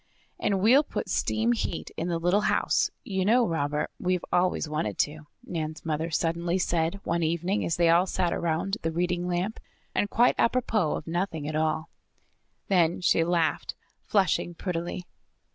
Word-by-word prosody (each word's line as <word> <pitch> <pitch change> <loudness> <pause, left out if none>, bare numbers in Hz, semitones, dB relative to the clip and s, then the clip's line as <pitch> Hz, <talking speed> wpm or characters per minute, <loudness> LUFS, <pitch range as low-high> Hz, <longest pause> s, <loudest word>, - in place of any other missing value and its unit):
"And 195 -2 0
we'll 245 +8 +6
put 300 - -5
steam 225 +2 +1
heat 225 -7 -2
in 165 - -3
the 170 -1 0
little 175 +5 +2
house. - - +2
You 190 -2 -1
know, 235 +5 +4
Robert, 150 -2 -1
we've 180 -1 0
always 180 -2 +2
wanted 150 -10 -2
to," 150 0 -4 0.2
Nan's 155 -2 -4
mother 160 +1 -1
suddenly 170 +2 0
said 170 +1 0
one 170 0 0
evening 170 +5 0
as 165 - 0
they 170 -1 +3
all 170 +3 +4
sat 180 -2 0
around 170 +5 -1
the 165 - -1
reading 175 +1 -1
lamp, 180 +5 -2 0.3
and 205 - 0
quite 240 +4 +4
apropos 225 -8 +1
of - - -6
nothing 165 -3 -2
at 155 - -3
all. 155 +1 0 0.8
Then 175 -3 +3
she 170 -2 +3
laughed, 170 -1 0 0.3
flushing 190 -3 +1
prettily. 175 0 -4
175 Hz, 160 wpm, -27 LUFS, 160-190 Hz, 0.8 s, we'll